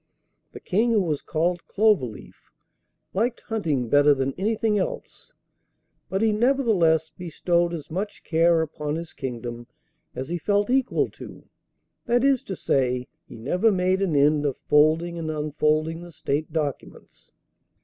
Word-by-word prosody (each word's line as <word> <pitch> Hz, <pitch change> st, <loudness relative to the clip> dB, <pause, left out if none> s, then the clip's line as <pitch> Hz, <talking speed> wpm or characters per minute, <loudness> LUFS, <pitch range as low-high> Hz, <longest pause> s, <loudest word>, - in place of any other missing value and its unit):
The -, -, -10 dB
King, 230 Hz, +5 st, +1 dB
who 215 Hz, -, +3 dB
was 155 Hz, -6 st, -1 dB
called 175 Hz, +2 st, -1 dB
Cloverleaf, 195 Hz, -, 0 dB, 0.6 s
liked 230 Hz, +5 st, -1 dB
hunting 160 Hz, -, -2 dB
better 145 Hz, +3 st, +5 dB
than 135 Hz, 0 st, -1 dB
anything 215 Hz, +1 st, 0 dB
else; 185 Hz, -, -5 dB, 0.8 s
but 195 Hz, +3 st, -1 dB
he 220 Hz, -, +3 dB
nevertheless 210 Hz, -, +2 dB
bestowed 175 Hz, 0 st, 0 dB
as 165 Hz, -2 st, -7 dB
much 200 Hz, +5 st, -4 dB
care 165 Hz, 0 st, +3 dB
upon 150 Hz, -1 st, -4 dB
his 165 Hz, 0 st, -6 dB
kingdom 120 Hz, -2 st, -6 dB, 0.5 s
as 130 Hz, -, -5 dB
he 175 Hz, 0 st, -2 dB
felt 205 Hz, +5 st, +1 dB
equal 260 Hz, -1 st, +1 dB
to -, -, -12 dB, 0.6 s
that 240 Hz, +1 st, +2 dB
is 275 Hz, -2 st, +3 dB
to 190 Hz, -, -4 dB
say, 125 Hz, -5 st, 0 dB, 0.2 s
he -, -, -11 dB
never 180 Hz, -, +1 dB
made 185 Hz, 0 st, +1 dB
an 180 Hz, -6 st, 0 dB
end 145 Hz, +1 st, +3 dB
of 140 Hz, -3 st, -1 dB
folding 160 Hz, +3 st, +3 dB
and 160 Hz, -1 st, -4 dB
unfolding 155 Hz, +1 st, 0 dB
the 175 Hz, 0 st, -11 dB
State 150 Hz, 0 st, -3 dB
documents. 150 Hz, -4 st, -5 dB
165 Hz, 145 wpm, -24 LUFS, 150-200 Hz, 0.8 s, better